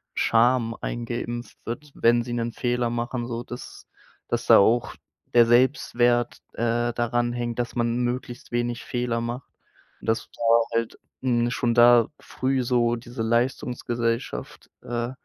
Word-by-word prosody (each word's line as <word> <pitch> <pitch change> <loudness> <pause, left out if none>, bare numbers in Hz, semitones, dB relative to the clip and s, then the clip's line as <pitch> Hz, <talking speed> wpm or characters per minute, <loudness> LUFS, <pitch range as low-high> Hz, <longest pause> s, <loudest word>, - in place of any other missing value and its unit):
Scham 115 0 +3
eingeeimpft 120 -1 -4
wird, 130 +6 -6
wenn 120 +1 +4
sie 120 0 -5
'nen 120 0 -1
Fehler 120 -1 0
machen, 120 +1 -3
sodass 120 +1 -7 0.4
dass - - -1
da - - +8
auch 115 +4 +2 0.4
der 120 -1 +7
Selbstwert, 120 -1 +2
äh, 120 +1 0
daran 120 0 0
hängt, 120 -1 -3
dass 120 -1 -2
man 120 -1 0
möglichst 120 0 -4
wenig 120 0 -2
Fehler 120 -1 -2
macht. 120 +2 -5 0.5
Und - - -11
das 115 0 -1
war 115 0 +4
halt, 115 -1 -1 0.2
hm, 120 -2 +2
schon 120 -1 0
da 120 -1 +6
früh 130 0 -1
so 120 -1 +2
diese 120 0 -6
Leistungsgesellschaft, 120 0 -2
äh, 120 0 -3
120 Hz, 140 wpm, -25 LUFS, 115-120 Hz, 0.5 s, da